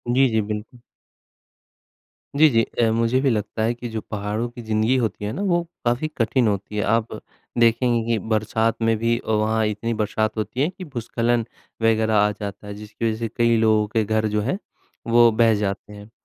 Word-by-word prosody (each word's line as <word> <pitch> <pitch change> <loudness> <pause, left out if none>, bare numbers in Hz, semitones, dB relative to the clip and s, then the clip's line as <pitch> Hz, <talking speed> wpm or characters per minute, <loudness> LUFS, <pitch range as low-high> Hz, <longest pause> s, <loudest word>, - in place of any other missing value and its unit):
जी, 135 +1 +5
जी, 110 -1 +1
बिल्कुल। 105 +3 -6 1.6
जी, 155 +2 +7
जी, 115 -4 +3
अ, 115 0 0
मुझे 115 +3 +2
भी 140 - +2
लगता 110 -1 -2
है 115 +2 +1
कि 120 0 -7
जो 110 -1 -4
पहाड़ों 105 +2 -2
की 120 0 -10
ज़िंदगी 110 +2 +1
होती 110 -4 -2
है 105 - -2
ना - - -4
वो 175 -4 +1 0.2
काफ़ी 120 +6 +1
कठिन 120 +1 +2
होती 100 0 -2
है। - - +1
आप 115 +1 +1 0.5
देखेंगे 120 0 +3
कि 115 - +2
बरसात 110 +1 +1
में 115 0 +3
भी 115 +1 +1
अ, - - -10
वहाँ 110 +1 +1
इतनी 105 +2 -2
बरसात 110 0 -1
होती 110 +4 -2
है 150 - +2
कि 185 0 -10
भूस्खलन 120 -3 -1 0.4
वग़ैरह 110 -1 +2
आ 105 0 +4
जाता 105 0 -7
है 105 - -6
जिसकी 105 +2 -6
वज़ह 110 0 -3
से 115 - -2
कई 115 -1 +3
लोगों 110 -1 +3
के 110 +1 0
घर 110 +1 0
जो 105 - +2
है 135 - -1 0.5
वो 120 0 +6
बह 115 0 +4
जाते 100 0 -3
हैं। 105 +1 -12
110 Hz, 200 wpm, -22 LUFS, 105-120 Hz, 1.6 s, जी